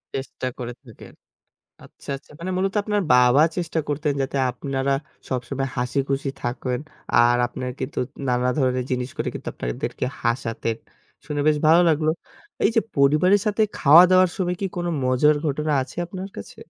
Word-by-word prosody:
চেষ্টা 130 Hz, -1 st, -4 dB
করে 120 Hz, 0 st, -5 dB
থাকেন। 115 Hz, -4 st, -14 dB, 0.7 s
আচ্ছা, -, -, -15 dB
আচ্ছা -, -, -21 dB
মানে 185 Hz, +2 st, -4 dB
মূলত 190 Hz, +1 st, 0 dB
আপনার 210 Hz, -1 st, 0 dB
বাবা 125 Hz, +3 st, +6 dB, 0.2 s
চেষ্টা 170 Hz, -2 st, -1 dB
করতেন 150 Hz, 0 st, -1 dB
যাতে 135 Hz, +1 st, -2 dB
আপনারা 135 Hz, +2 st, -2 dB, 0.4 s
সবসময় 130 Hz, +1 st, -2 dB
হাসিখুশি 135 Hz, +3 st, -1 dB
থাকেন 125 Hz, +1 st, -2 dB, 0.3 s
আর 120 Hz, +1 st, +5 dB
আপনার 125 Hz, +1 st, -5 dB
কিন্তু 130 Hz, +2 st, -4 dB, 0.3 s
নানা 125 Hz, 0 st, +1 dB
ধরনের 130 Hz, -2 st, +1 dB
জিনিস 125 Hz, 0 st, -1 dB
করে -, -, -2 dB
কিন্তু -, -, -8 dB
আপনাদেরকে -, -, -4 dB, 0.2 s
হাসাতেন, 115 Hz, -1 st, -1 dB, 0.5 s
শুনে 145 Hz, -1 st, -2 dB
বেশ 155 Hz, -1 st, +4 dB
ভালো 165 Hz, +3 st, +7 dB
লাগলো। 155 Hz, 0 st, +2 dB, 0.5 s
এই -, -, +5 dB
যে 225 Hz, -, +5 dB, 0.2 s
পরিবারের 155 Hz, +8 st, +4 dB
সাথে 210 Hz, +1 st, +1 dB, 0.2 s
খাওয়া-দাওয়ার 180 Hz, +5 st, +7 dB
সময় 180 Hz, -1 st, -1 dB
কি 195 Hz, -, 0 dB
কোনো 175 Hz, 0 st, -1 dB
মজার 130 Hz, +4 st, +3 dB
ঘটনা 150 Hz, +1 st, -1 dB
আছে 130 Hz, -, -9 dB
আপনার 190 Hz, +2 st, -7 dB
কাছে? 100 Hz, -, -9 dB
140 Hz, 155 wpm, -23 LUFS, 125-170 Hz, 0.7 s, ভালো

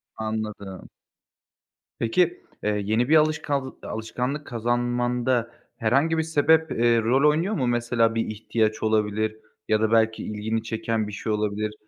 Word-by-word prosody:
Anladım. 110 Hz, -3 st, -5 dB, 1.1 s
Peki, 175 Hz, +10 st, +1 dB, 0.2 s
eee, 105 Hz, -, +1 dB, 0.2 s
yeni 110 Hz, +5 st, +1 dB
bir 160 Hz, -, +6 dB
alışkanl 150 Hz, -3 st, +1 dB
alışkanlık 125 Hz, +6 st, -4 dB
kazanmanda 120 Hz, 0 st, 0 dB, 0.3 s
herhangi 135 Hz, +8 st, +2 dB
bir 160 Hz, -, +2 dB
sebep, 160 Hz, 0 st, +3 dB
eee, 115 Hz, 0 st, +3 dB
rol 130 Hz, +6 st, +4 dB
oynuyor 165 Hz, +8 st, 0 dB
mu? 130 Hz, -, 0 dB
Mesela, 120 Hz, -1 st, +1 dB
bir 115 Hz, -, 0 dB
ihtiyaç 110 Hz, 0 st, -1 dB
olabilir 110 Hz, 0 st, 0 dB, 0.3 s
ya 110 Hz, 0 st, +2 dB
da 110 Hz, 0 st, +1 dB
belki 110 Hz, -1 st, +2 dB
ilgini 110 Hz, +1 st, -2 dB
çeken 110 Hz, -1 st, -2 dB
bir -, -, -6 dB
şey 110 Hz, -, -3 dB
olabilir. 105 Hz, 0 st, -1 dB
115 Hz, 135 wpm, -25 LUFS, 110-130 Hz, 1.1 s, bir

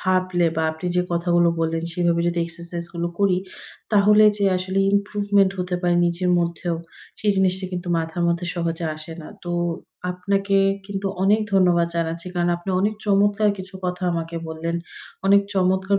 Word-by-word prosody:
ভাবলে 185 Hz, -2 st, +1 dB
বা 160 Hz, -, +1 dB
আপনি 160 Hz, +3 st, -7 dB
যে 180 Hz, -, +3 dB
কথাগুলো 175 Hz, 0 st, +3 dB
বললেন 165 Hz, 0 st, 0 dB
সেভাবে 170 Hz, 0 st, +1 dB
যদি 175 Hz, 0 st, 0 dB
exercise 170 Hz, 0 st, -7 dB
গুলো 170 Hz, 0 st, -1 dB
করি। 195 Hz, -3 st, +3 dB, 0.5 s
তাহলে 210 Hz, +1 st, +6 dB
যে 200 Hz, -, +1 dB
আসলে 185 Hz, +1 st, -2 dB, 0.2 s
improvement 200 Hz, -1 st, +2 dB
হতে 180 Hz, 0 st, -2 dB
পারে 175 Hz, -1 st, +2 dB
নিজের 175 Hz, +1 st, 0 dB
মধ্যেও, 170 Hz, 0 st, -1 dB, 0.5 s
সেই 210 Hz, -, +2 dB
জিনিসটি 190 Hz, 0 st, +2 dB
কিন্তু 180 Hz, 0 st, -4 dB
মাথার 165 Hz, +1 st, -3 dB
মধ্যে 170 Hz, +1 st, -1 dB
সহজে 170 Hz, -1 st, -2 dB
আসে 155 Hz, +2 st, -7 dB
না। -, -, -10 dB, 0.2 s
তো 175 Hz, -, -4 dB, 0.6 s
আপনাকে 195 Hz, +2 st, 0 dB, 0.3 s
কিন্তু 195 Hz, 0 st, -4 dB, 0.2 s
অনেক 205 Hz, +3 st, +4 dB
ধন্যবাদ 180 Hz, -3 st, +4 dB
জানাচ্ছি। 165 Hz, +1 st, -2 dB
কারণ 175 Hz, -1 st, +1 dB
আপনি 175 Hz, +3 st, -6 dB
অনেক 210 Hz, +2 st, +1 dB
চমৎকার 205 Hz, +1 st, +3 dB
কিছু 190 Hz, +1 st, -8 dB
কথা 180 Hz, +1 st, -3 dB
আমাকে 165 Hz, 0 st, -3 dB
বললেন, 165 Hz, +1 st, -3 dB, 0.5 s
অনেক 200 Hz, +1 st, +6 dB
চমৎকার 190 Hz, +1 st, +2 dB
180 Hz, 160 wpm, -22 LUFS, 170-195 Hz, 0.6 s, তাহলে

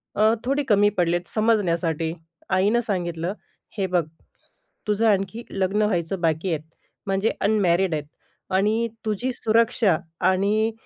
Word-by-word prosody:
अ, 215 Hz, +2 st, +4 dB
थोडी 275 Hz, +3 st, +1 dB
कमी 205 Hz, -1 st, +5 dB
पडलेत 175 Hz, 0 st, +1 dB
समजण्यासाठी. 170 Hz, -7 st, +1 dB, 0.4 s
आईनं 205 Hz, +5 st, +3 dB
सांगितलं, 175 Hz, -2 st, -2 dB, 0.4 s
"हे 195 Hz, -, +1 dB
बघ, 180 Hz, -2 st, +1 dB, 0.9 s
तुझं 210 Hz, +2 st, +2 dB
आणखी 200 Hz, +3 st, 0 dB
लग्न 195 Hz, +2 st, 0 dB
व्हायचं 185 Hz, -3 st, 0 dB
बाकी 165 Hz, +2 st, 0 dB
आहे. 150 Hz, -, -4 dB, 0.5 s
म्हणजे 195 Hz, +3 st, +1 dB
अनमॅरिड 190 Hz, -4 st, +2 dB
आहे 150 Hz, -, -2 dB, 0.5 s
आणि 220 Hz, +4 st, +1 dB, 0.2 s
तुझी 220 Hz, +4 st, -1 dB
सुरक्षा 225 Hz, -5 st, +2 dB, 0.3 s
आणि 205 Hz, +4 st, +2 dB
195 Hz, 120 wpm, -24 LUFS, 175-220 Hz, 0.9 s, कमी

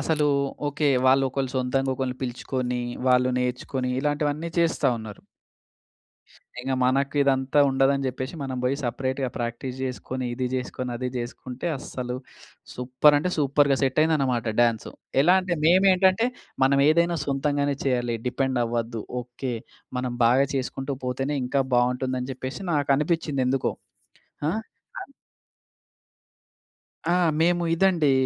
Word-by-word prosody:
అసలూ 150 Hz, 0 st, +1 dB, 0.4 s
ఓకె 145 Hz, +1 st, 0 dB, 0.2 s
వాళ్ళొకళ్ళు 135 Hz, 0 st, +2 dB
సొంతంగా 130 Hz, +1 st, 0 dB
ఒకళ్ళని 130 Hz, -1 st, -3 dB
పిలుచుకొని 125 Hz, 0 st, -2 dB, 0.3 s
వాళ్ళు 125 Hz, 0 st, +4 dB
నేర్చుకొని 125 Hz, +1 st, -2 dB
ఇలాంటివన్నీ 150 Hz, +2 st, -1 dB
చేస్తా 165 Hz, -4 st, +2 dB
ఉన్నారు. 110 Hz, -2 st, -9 dB, 1.4 s
ఇక 130 Hz, +1 st, -3 dB
మనకిదంతా 135 Hz, +1 st, +2 dB
ఉండదని 135 Hz, +1 st, +2 dB
జెప్పేసి, 130 Hz, +3 st, -4 dB
మనం 130 Hz, -1 st, -4 dB
బోయి 130 Hz, +2 st, +1 dB
సెపరేట్‌గా 130 Hz, +2 st, -2 dB
ప్రాక్టీస్ 120 Hz, +2 st, -4 dB
జేసుకొని 130 Hz, 0 st, -4 dB
ఇది 130 Hz, 0 st, -2 dB
జేసుకొని, 125 Hz, 0 st, -3 dB
అది 125 Hz, +1 st, -3 dB
జేసుకుంటే 125 Hz, +4 st, -6 dB
అస్సలు 125 Hz, -1 st, -5 dB, 0.6 s
సూపర్ 130 Hz, +4 st, +3 dB
అంటే 180 Hz, +5 st, -1 dB
సూపర్‌గా 140 Hz, -1 st, +3 dB
సెట్ 130 Hz, +2 st, +1 dB
అయిందనమాట 135 Hz, -7 st, +1 dB
డ్యాన్సు. 115 Hz, -2 st, +1 dB, 0.3 s
ఎలా 180 Hz, +4 st, +5 dB
అంటే 180 Hz, -1 st, -2 dB
మేమేంటంటే 190 Hz, +4 st, +5 dB, 0.4 s
మనమేదైనా 155 Hz, +5 st, +3 dB
సొంతంగానే 145 Hz, 0 st, 0 dB
చేయాలి. 120 Hz, -3 st, 0 dB
డిపెండ్ 130 Hz, -1 st, 0 dB
అవ్వద్దు. 115 Hz, -1 st, -3 dB, 0.2 s
ఓకె. 125 Hz, +1 st, -5 dB, 0.4 s
మనం 125 Hz, -1 st, -2 dB
బాగా 130 Hz, +4 st, +4 dB
చేసుకుంటూ 135 Hz, +1 st, -3 dB
పోతేనే, 135 Hz, +3 st, -1 dB
ఇంకా 135 Hz, +2 st, +1 dB
బావుంటుందని 125 Hz, +1 st, 0 dB
జెప్పేసి 130 Hz, +8 st, -6 dB
నాకనిపించిందేందుకో. 140 Hz, -2 st, +1 dB, 0.8 s
ఆ! -, -, +1 dB, 0.5 s
ఆద్ 275 Hz, -, -11 dB, 2.0 s
ఆ! -, -, +4 dB, 0.3 s
మేము 175 Hz, +1 st, +3 dB
ఇదండీ, 170 Hz, -6 st, +3 dB
135 Hz, 115 wpm, -25 LUFS, 125-145 Hz, 2.0 s, ఎలా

